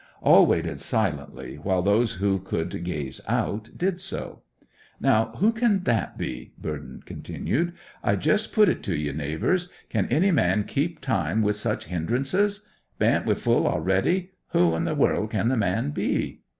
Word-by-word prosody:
All - - +7
waited - - 0
silently, 65 +1 -2
while 95 0 +1
those 105 +4 +3
who 95 0 0
could 85 -2 -3
gaze 75 -7 -4
out 110 +2 -1
did 185 0 -1
so. 190 - -5 0.6
'Now, 110 +1 +2
who 215 +4 +4
can 225 -4 +1
that 115 - 0
be?' 60 -1 -5
Burthen - - -6
continued. 170 +6 -2 0.3
'I - - +2
just 215 +1 +1
put 215 -2 +5
it 175 - +1
to 95 - -2
ye, 75 -1 -2
neighbours, 80 - -1 0.2
can - - 0
any 190 +6 +3
man 105 - +2
keep 155 +8 -2
time 110 - 0
with 105 0 +1
such 105 +1 -2
hindrances? 140 - 0 0.3
Bain't - - +2
we - - +3
full - - +2
a'ready? 175 - +1 0.2
Who 85 -2 +4
in 80 - -1
the - - -1
world 105 - +2
can 110 +1 0
the 130 - +2
man 95 -5 0
be? - - -2
110 Hz, 165 wpm, -25 LUFS, -, 0.6 s, All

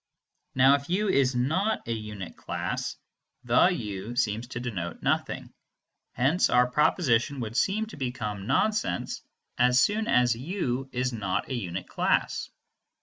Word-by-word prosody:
Now 135 +1 +6
if 140 +1 -1
u 200 +3 +1
is 135 -7 +3
not 170 - 0
a 115 - 0
unit 105 -4 -6
class, - - -3 0.5
"the 120 +7 +5
u" 110 - -3
seems 115 -1 0
to 120 -1 -5
denote 100 -9 -5
nothing; - - -1 0.6
hence 140 +8 +2
our 125 - +5
proposition 140 0 +2
would 115 -1 -5
seem 210 - +1
to 220 - -11
become 110 -7 -4
nonsense 170 - 0 0.4
as 125 +1 +5
soon 215 +7 +2
as 125 - +3
u 130 - -3
is 125 0 -1
not 100 -5 -2
a - - -2
unit 95 -7 -4
class. - - 0
125 Hz, 145 wpm, -27 LUFS, 115-145 Hz, 0.6 s, Now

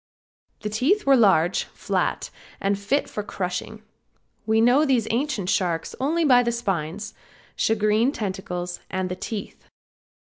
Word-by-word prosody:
The 210 - -3
teeth 270 - +1
were 275 -1 +6
large, 190 -7 +3
flat - - -2 0.3
and 200 0 0
fit 260 +9 0
for 210 - -4
crushing. 200 +2 -5 0.6
We 220 0 +3
know 245 +6 +5
these 255 -7 +2
ancient 235 -6 -1
sharks 170 -3 -1
only 320 +5 +1
by 250 -4 +6
the 235 -1 0
spines, 200 -4 -3 0.4
shagreen 220 +3 +2
tentacles 185 -6 -4
and 185 -1 -2
the 180 - -3
teeth. 205 +1 -7
215 Hz, 135 wpm, -24 LUFS, 190-245 Hz, 0.6 s, were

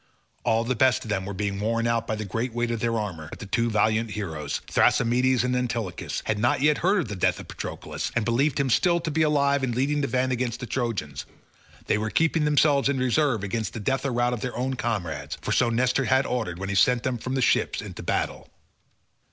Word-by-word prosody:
All 115 -1 +2
the 125 +2 0
best 130 +1 +3
of 110 - -5
them 95 -2 -1
were 100 - -4
being 100 0 -2
worn 115 +2 0
out 115 -1 0
by 110 - -1
the 110 0 -5
great 115 +5 -3
weight 120 0 -1
of 115 - -2
their 115 0 0
armour, 90 -8 -4
but - - -9
the - - -8
two 115 +4 0
valiant 110 +1 +1
heroes, 80 -9 -4
Thrasymedes 125 +2 +3
and 125 0 0
Antilochus, 115 -7 -3
had 105 -1 -1
not 120 +3 +2
yet 150 +2 +3
heard 190 +2 +2
of 150 - -5
the 105 - -5
death 90 - +1
of - - -10
Patroclus, - - -5
and 115 -3 +1
believed 130 +5 +1
him 140 -1 +1
to - - +4
be - - +7 0.5
still 155 - +4
alive 140 -1 +2
and 125 -3 -1
leading 145 +4 +1
the 140 - 0
van 130 +1 0
against 125 -1 -2
the 125 - -5
Trojans; 110 - -3 0.6
they - - +1
were 110 +1 -2
keeping 165 +3 +2
themselves 145 -2 +3
in 140 - 0
reserve 130 -3 +1
against 110 +2 -3
the 115 - -5
death 135 +6 -1
or 140 - -1
rout 120 0 +1
of 120 - -4
their 125 -2 -4
own 130 +2 -1
comrades, 85 - -3
for - - -4
so 120 - +3
Nestor 125 +3 +1
had 130 +2 +3
ordered 110 -9 -2
when 95 +1 -5
he - - -1
sent 120 +5 +3
them 125 -2 -1
from 130 +4 -3
the 135 - 0
ships - - +2
into - - -7
battle. - - -2
120 Hz, 235 wpm, -25 LUFS, 110-130 Hz, 0.6 s, be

